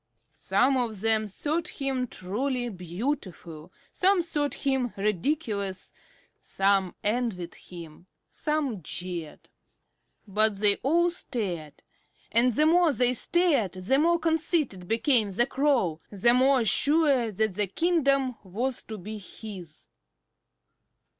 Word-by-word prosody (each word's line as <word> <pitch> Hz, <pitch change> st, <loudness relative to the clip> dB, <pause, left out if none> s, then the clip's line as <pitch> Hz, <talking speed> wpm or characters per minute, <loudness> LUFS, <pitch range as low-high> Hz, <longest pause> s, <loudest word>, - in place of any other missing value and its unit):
Some 265 Hz, +1 st, +1 dB
of 225 Hz, -6 st, -2 dB
them 220 Hz, -1 st, +2 dB
thought 310 Hz, -, -3 dB
him 270 Hz, -5 st, -3 dB
truly 245 Hz, +6 st, -3 dB
beautiful, 180 Hz, -, -5 dB, 0.2 s
some 380 Hz, -1 st, +3 dB
thought 295 Hz, -4 st, -2 dB
him 265 Hz, -4 st, -1 dB
ridiculous; 205 Hz, -, -2 dB, 0.5 s
some 195 Hz, -2 st, 0 dB
envied 210 Hz, -6 st, -1 dB
him, 170 Hz, -1 st, -12 dB, 0.2 s
some 295 Hz, -, -2 dB
jeered. 170 Hz, 0 st, -6 dB, 0.8 s
But 215 Hz, +1 st, +2 dB
they 205 Hz, -1 st, +5 dB
all 345 Hz, +5 st, +2 dB
stared; 180 Hz, -, -5 dB, 0.5 s
and 240 Hz, +3 st, +3 dB
the 300 Hz, +7 st, +2 dB
more 340 Hz, 0 st, +4 dB
they 250 Hz, -1 st, +2 dB
stared 290 Hz, -, +1 dB
the 190 Hz, +9 st, 0 dB
more 340 Hz, +3 st, +3 dB
conceited 320 Hz, -, -1 dB
became 225 Hz, -, +2 dB
the 210 Hz, +5 st, +2 dB
Crow, 265 Hz, -, 0 dB
the 215 Hz, +4 st, +3 dB
more 260 Hz, -1 st, +3 dB
sure 280 Hz, -2 st, +4 dB
that 215 Hz, 0 st, -1 dB
the 205 Hz, +1 st, -1 dB
kingdom 275 Hz, -, +1 dB
was 230 Hz, +7 st, -3 dB
to 220 Hz, -, -6 dB
be 210 Hz, +3 st, -7 dB
his. 185 Hz, -5 st, -10 dB
230 Hz, 115 wpm, -27 LUFS, 195-280 Hz, 0.8 s, they